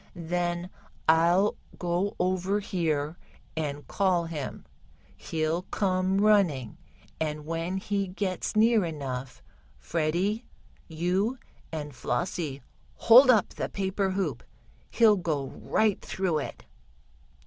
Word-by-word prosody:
"Then 175 +1 -2 0.4
I'll 170 +5 +4 0.2
go 175 +3 -1
over 185 +2 +1
here 160 -5 -1 0.4
and 145 -2 -3
call 185 -4 +1
him. 155 -5 -6 0.5
He'll 160 +1 -1
come 190 0 0
running, 180 - +2 0.4
and 150 -1 -2
when 165 +3 -2
he 200 -1 -1
gets 185 +1 -3
near 220 0 +5
enough, 135 - -5 0.3
Freddie, 175 +8 -1 0.4
you 185 +9 0 0.3
and 150 -2 -5
Flossie 145 +2 -3 0.3
hold 250 +4 +7
up 220 -6 +5
the - - -4
paper 195 0 -1
hoop. 185 - -2 0.5
He'll 220 -3 +5
go 155 -6 -1
right 215 -3 0
through 180 -5 -1
it." - - -7
175 Hz, 105 wpm, -28 LUFS, 155-195 Hz, 0.5 s, hold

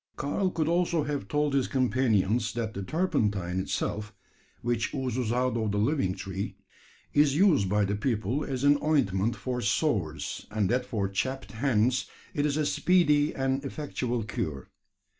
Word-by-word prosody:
Karl 165 +7 0
could 160 -3 -1
also 170 -1 +2
have 145 -1 -3
told 150 -1 0
his 135 -2 +2
companions, 120 -4 +1
that 115 -2 -2
the 100 - -4
turpentine 105 - 0
itself 105 +2 -3 0.5
which 120 +3 -1
oozes 125 -3 -1
out 125 0 +1
of 110 -3 0
the 100 - -1
living 105 -4 +1
tree 95 0 -5 0.6
is 145 -1 +4
used 155 - +4
by 105 +1 +2
the 100 - -1
people 115 +4 -1
as 130 -1 -3
an 145 0 +5
ointment 115 -8 +1
for 125 -1 -3
sores 105 - -1
and 105 -3 0
that 125 0 0
for 100 -4 -1
chapped 130 +7 -3
hands 125 0 +1 0.3
it 145 0 +1
is 145 0 -1
a 155 - +1
speedy 150 -4 +3
and 135 +1 0
effectual 130 -4 -3
cure. 85 - -4
125 Hz, 160 wpm, -28 LUFS, 105-145 Hz, 0.6 s, an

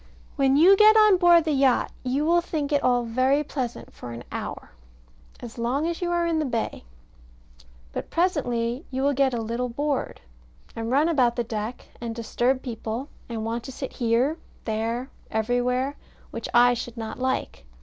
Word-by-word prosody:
When 270 -1 +3
you 365 +6 +7
get 430 +2 +7
on 425 -3 +6
board 345 -2 +6
the 315 - -1
yacht, 270 -3 +2
you 265 +4 -1
will 345 +2 +4
think 305 -4 -3
it 285 -1 +2
all 245 -1 +2
very 255 +5 +2
pleasant 260 -5 -5
for 120 - -9
an 115 +1 -8
hour, - - -6 0.7
as 235 0 -9
long 255 +6 0
as 340 +1 -3
you 350 - -1
are 345 0 +1
in 330 -1 +1
the - - +1
bay. 235 - -3 1.1
But - - -5
presently 255 -7 0
you 265 0 -2
will 285 +1 +3
get 265 -2 +2
a - - -2
little 235 +3 -2
bored, 285 +3 -2 0.6
and 225 0 -4
run 285 +5 +3
about 255 -8 +2
the 240 - 0
deck, 220 +1 -5
and 230 -1 -4
disturb 240 +3 0
people, 235 +2 -5 0.2
and 225 -2 -4
want 230 +1 -3
to 265 - -6
sit 265 +1 -6
here, 245 +6 +1 0.3
there, 225 +1 -1
and 260 - -9 0.2
everywhere, 245 +4 0 0.3
which - - -5
I 245 +1 +6
should 240 0 -6
not 220 +1 -6
like. 260 - -2
255 Hz, 180 wpm, -25 LUFS, 235-295 Hz, 1.1 s, you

